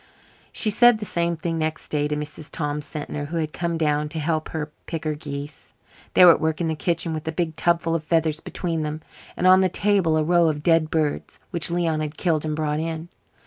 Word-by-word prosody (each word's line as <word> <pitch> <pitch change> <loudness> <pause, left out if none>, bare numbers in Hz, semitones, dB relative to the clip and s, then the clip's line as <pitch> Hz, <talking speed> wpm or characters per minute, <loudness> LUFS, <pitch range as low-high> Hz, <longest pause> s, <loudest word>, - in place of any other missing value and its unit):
She 215 - +1
said 240 +2 +6
the 210 - -6
same 170 -2 -1
thing 165 0 -2
next 155 0 -3
day 150 -1 0
to 150 - -2
Mrs. 150 0 -7
Tom 150 -1 -3
Sentner, 145 -1 -6
who 165 +2 -4
had 155 -2 -2
come 170 -1 -2
down 150 -1 0
to 160 - -7
help 155 0 -1
her 155 -1 -4 0.2
pick 165 -2 -4
her 155 -1 -1
geese. 145 -1 -8 0.4
They 180 - +8
were 175 - +10
at - - +1
work 160 0 0
in 170 - 0
the 160 - 0
kitchen 165 0 0
with 155 0 -5
a - - 0
big 160 -1 -2
tubful 170 0 +1
of 165 -2 -1
feathers 160 -1 +1
between 165 -3 -3
them, 155 +1 -4 0.4
and - - -1
on 185 +1 +7
the 185 - +3
table 185 -4 +2
a 155 - +2
row 170 +1 +4
of 150 -1 -3
dead 165 -2 +3
birds, 155 -3 -2
which 170 -1 +2
Leon 170 -2 0
had 155 0 -4
killed 160 -4 0
and 155 -1 -2
brought 150 -1 -1
in. 160 +1 -4
160 Hz, 230 wpm, -23 LUFS, 150-170 Hz, 0.4 s, were